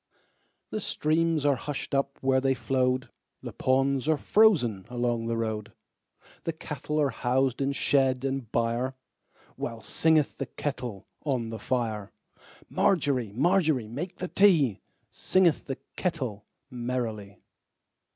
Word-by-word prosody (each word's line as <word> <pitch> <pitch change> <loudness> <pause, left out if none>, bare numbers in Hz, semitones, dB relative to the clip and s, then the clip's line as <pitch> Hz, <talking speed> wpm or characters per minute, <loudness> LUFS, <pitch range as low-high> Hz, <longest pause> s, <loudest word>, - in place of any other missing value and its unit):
The 215 - -2
streams 160 -4 +1
are 145 - +5
hushed 145 +3 -5
up 140 0 0
where 130 0 +3
they 135 0 +2
flowed, 130 +1 0 0.3
The - - -6
ponds 135 +1 +1
are 155 - +4
frozen 145 - +3
along 120 -2 -1
the 115 0 -1
road, 110 -2 -3 0.7
The 165 - -2
cattle 150 -1 -4
are 145 -3 +2
housed 130 +2 0
in 135 0 +1
shed 135 -2 +2
and 135 -4 -3
byreWhile 120 -1 -4
singeth 160 -3 +2
the 135 - -2
kettle 120 -7 -5 0.2
on 125 -6 -1
the 110 - -5
fire. 110 -4 -2 0.6
Margery, 135 - +1
Margery, 145 - +2
make 145 - -5
the 180 - -4
tea, 165 - +4 0.3
Singeth 185 -4 +2
the 135 - -4 0.2
kettle 130 - -3 0.2
merrily. 120 -5 -3
130 Hz, 125 wpm, -28 LUFS, 120-150 Hz, 0.7 s, are